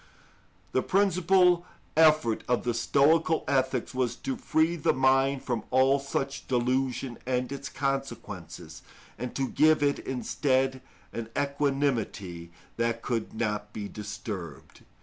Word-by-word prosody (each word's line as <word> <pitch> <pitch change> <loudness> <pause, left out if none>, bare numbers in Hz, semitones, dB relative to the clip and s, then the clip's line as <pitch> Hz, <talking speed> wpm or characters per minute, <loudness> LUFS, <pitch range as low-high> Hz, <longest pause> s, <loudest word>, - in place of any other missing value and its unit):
The 130 - +2
principal 185 -1 +3 0.3
effort 155 -7 +4
of 125 - +1
the 120 - 0
Stoical 155 +7 +3
ethics 130 -2 0
was 125 -2 0
to 135 - -4
free 160 +2 +1
the 155 - +1
mind 135 +1 +3
from 120 -4 -2
all 130 +2 +4
such 140 0 -3
delusion 125 0 0
and 125 0 -1
its 140 0 -5
consequences, 105 - -4 0.4
and 125 0 -5
to 135 -1 0
give 155 -1 +4
it 140 0 +2
instead 130 0 0 0.3
an 115 -1 -5
equanimity 135 - -1 0.3
that 115 0 -1
could 115 -3 -2
not 105 -2 -2
be 105 -2 -5
disturbed. 100 - -7
130 Hz, 125 wpm, -28 LUFS, 115-140 Hz, 0.4 s, effort